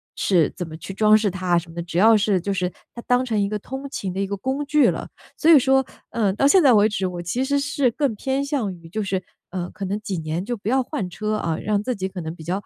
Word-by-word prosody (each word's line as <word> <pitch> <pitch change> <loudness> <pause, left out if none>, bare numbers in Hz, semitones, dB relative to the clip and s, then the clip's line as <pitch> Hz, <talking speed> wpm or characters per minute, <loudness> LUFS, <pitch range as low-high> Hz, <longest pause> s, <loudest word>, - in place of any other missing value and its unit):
是 175 -6 +2
怎 180 -3 -5
么 155 - -8
去 195 - -8
装 215 +2 +5
饰 210 -2 0
它 185 0 -6
啊， 175 -1 +4
什 170 0 -3
么 - - -12
的。 170 - -4
只 170 0 -5
要 220 +4 +6
是 205 -3 +2
就 200 +3 -2
是 180 -1 -1 0.2
它 235 - -8
当 250 +1 +3
成 220 -4 0
一 200 - 0
个 210 - -2
通 265 +6 -7
勤 190 -8 -4
的 190 - -4
一 195 - 0
个 200 +1 -3
工 265 +8 -2
具 300 -1 +4
了。 - - -6 0.3
所 320 - +2
以 325 - +10
说， 265 0 +3 0.3
呃， 215 -4 +1
到 275 +7 +3
现 370 +6 +6
在 275 -5 +6
为 210 -1 +5
止， 205 -3 -1
我 180 -1 -5
其 175 +9 -2
实 285 +1 +1
是 280 -2 +1
更 270 +1 -1
偏 265 +6 -2
向 275 -8 -1
于 170 -1 -14
就 215 +6 -3
是， 190 -2 -2 0.3
呃， 180 -1 -4
可 195 - -6
能 200 +3 -2
几 195 -4 -3
年 160 +3 -3
就 240 - -2
不 205 -1 -5
要 260 +1 +2
换 245 -9 -4
车， 210 +4 -3
啊。 165 -6 -1
嗯， - - -7
让 205 -1 +1
自 250 +3 -2
己 190 -2 -3
可 190 -1 -7
能 160 +1 -5
比 160 - -11
较 180 +5 -2
205 Hz, 320 characters per minute, -22 LUFS, 180-255 Hz, 0.3 s, 以